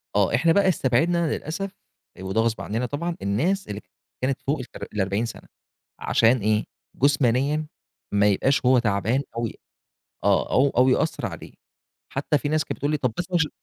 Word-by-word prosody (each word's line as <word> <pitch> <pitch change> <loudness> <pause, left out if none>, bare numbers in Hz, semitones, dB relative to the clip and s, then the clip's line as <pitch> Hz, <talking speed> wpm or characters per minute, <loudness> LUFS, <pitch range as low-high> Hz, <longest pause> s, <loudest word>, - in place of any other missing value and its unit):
آه، 100 +2 +3
إحنا 165 +7 +3
بقى 200 +1 +3
استبعدنا 165 +3 +2
للأسف 185 +6 -4 0.5
آآ، 95 - -9
وده 95 +4 0
غصب 115 -1 0
عنّنا 115 +4 -2
طبعًا 165 +7 -3
الناس 145 - 0
اللي 100 0 -5
ك 90 - -43 0.3
كانت 130 +1 -1
فوق 145 +2 -1
التلا 130 - -8
الأربعين 100 +2 0
سنة - - -9 0.5
عشان 115 +3 +3
إيه؟ 105 0 +1 0.3
جُسمانيًا 140 +2 +2 0.5
ما 100 0 +4
يبقاش 130 +7 +2
هو 130 0 +6
تعبان 115 +3 +1
أو 115 0 0
ي - - -7 0.7
آه، - - +2
أو 135 +2 +4
أو 125 +1 +3
يأثّر 130 - +1
عليه. - - -8 0.6
حتى 145 +2 +1
في 145 - -3
ناس 155 -1 +1
كانت - - -5
بتقول 145 - -1
لي - - +2
طب 130 -5 -1
بس 175 +1 -3
مش 165 -3 +2
130 Hz, 180 wpm, -24 LUFS, 110-150 Hz, 0.7 s, هو